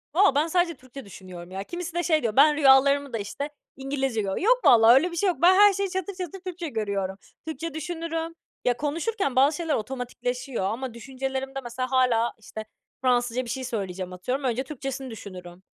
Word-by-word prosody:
Valla 375 -6 +5
ben 300 +3 +3
sadece 350 0 +1
Türkçe 255 +1 -12
düşünüyorum, 185 -2 -11
ya. 190 +1 -4
Kimisi 345 - -6
de 345 0 -1
şey, 315 -2 +2
diyor: 215 -2 -1
"Ben 295 +2 +6
rüyalarımı 280 -1 +4
da - - 0
işte, 255 +8 -5 0.3
İngilizce 270 -4 -1
görüyorum." 195 - -3
Yok - - +4
vallahi 230 0 +8
öyle 325 +8 +4
bir 340 - -6
şey 400 - +2
yok. 355 - -1
Ben 360 +2 +7
her 410 0 +7
şeyi 395 0 -1
çatır 375 +1 -3
çatır 365 0 -6
Türkçe 360 -2 -6
görüyorum. 200 -5 -2 0.3
Türkçe 320 0 -5
düşünürüm. 330 +1 -4 0.3
Ya, 245 -1 +2
konuşurken 315 - -2
bazı 280 +3 +4
şeyler 325 -3 -1
otomatikleşiyor 250 0 -4
ama 235 +5 -3
düşüncelerimde, 265 +2 -4
mesela, 255 +2 -4
hâlâ, 245 -3 +2
işte, 220 0 -8 0.4
Fransızca 245 -1 +1
bir 235 - -8
şey 260 +2 -3
söyleyeceğim, 190 -6 -4
atıyorum. 250 +10 -3
Önce 250 +1 0
Türkçesini 270 -2 -6
düşünürüm. 185 -4 -10
265 Hz, 185 wpm, -26 LUFS, 230-325 Hz, 0.4 s, vallahi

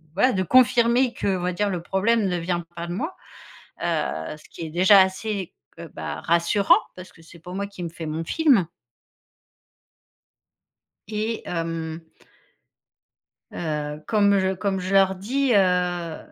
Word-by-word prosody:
voilà, 255 +6 +4
de 185 -1 0
confirmer, 245 +2 +4
qu'on 190 -2 -1
va 180 0 -1
dire, 205 +3 0
le 180 -3 -3
problème 205 +3 +1
ne 180 -1 -1
vient 175 +1 -2
pas 170 0 -5
de 175 - -4
moi», 315 - -4 0.7
heu, 155 - -2
ce - - -18
qui - - -11
est - - -8
déjà 185 +4 +6
assez, 190 0 -2 0.3
heu, 170 -1 -8
bah, - - -6
rassurant 170 +4 +3 0.2
parce 185 0 -11
que 165 - -19
c'est 170 +1 -15
pas 180 +2 -11
moi 200 +1 -3
qui 200 -3 -9
me 170 - -4
fais 165 0 -8
mon 155 +2 -3
film 265 - +3 2.4
et 220 +2 -3
hem 165 -1 -4 1.5
heu, 150 -2 -4
comme 200 -2 +3
je 190 0 +1
comme 190 0 -1
je 185 +2 -3
leur 190 -1 +4
dis: 255 +7 0
«Heu, 180 -3 +1
185 Hz, 155 wpm, -24 LUFS, 170-205 Hz, 2.4 s, déjà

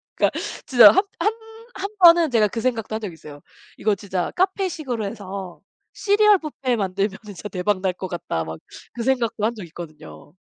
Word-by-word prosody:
그니까 - - +2 0.3
진짜 240 -6 +8
합 385 +3 +2
한 425 - +2 0.4
한 395 0 -3
번은 335 -4 +7
제가 220 -3 +4
그 225 +3 -5
생각도 225 -3 -2
한 - - -2
적이 205 -6 -6
있어요. 150 -2 -12 0.4
'이거 215 - +1
진짜 190 -3 -3
카페식으로 350 - -1
해서 195 -3 -7 0.3
시리얼 415 0 +4
뷔페 275 -6 -2
만들면은 195 0 -2 0.2
진짜 205 - -7
대박 190 0 -1
날 190 -1 0
것 185 +1 -6
같다.' 170 - -3
막 80 0 -7 0.4
그 235 - -4
생각도 235 -4 0
한 230 - 0
적이 205 -7 -9
있거든요. 155 -3 -11
215 Hz, 355 characters per minute, -22 LUFS, 185-275 Hz, 0.4 s, 진짜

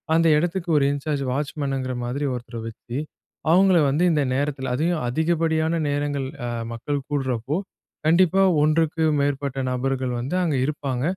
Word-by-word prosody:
அந்த 165 0 +4
எடத்துக்கு 175 +2 -2
ஒரு 140 - +3
இன்சார்ஜ் 145 0 -2
வாட்ச்மனுங்கிற 135 -2 -2
மாதிரி 130 +4 -2
ஒருத்தர 120 -1 -6
வச்சு, 120 +2 -7 0.5
அவங்கள 185 +1 +5
வந்து 150 +6 +1
இந்த 150 -2 +2
நேரத்துல 135 -2 -1
அதையும் 165 +3 0
அதிகப்படியான 160 +3 +1
நேரங்கள், 145 -1 -1 0.2
அ - - -2 0.3
மக்கள் 140 +5 -2
கூடுறப்போ, 135 0 -1 0.5
கண்டிப்பா 180 +3 +4 0.2
ஒன்றுக்கு 160 +1 +2 0.2
மேற்பட்ட 140 -1 -1
நபர்கள் 130 0 -1
வந்து 130 +9 -3
அங்க 160 -5 0
இருப்பாங்க. 135 -3 -2
145 Hz, 135 wpm, -23 LUFS, 130-160 Hz, 0.5 s, அவங்கள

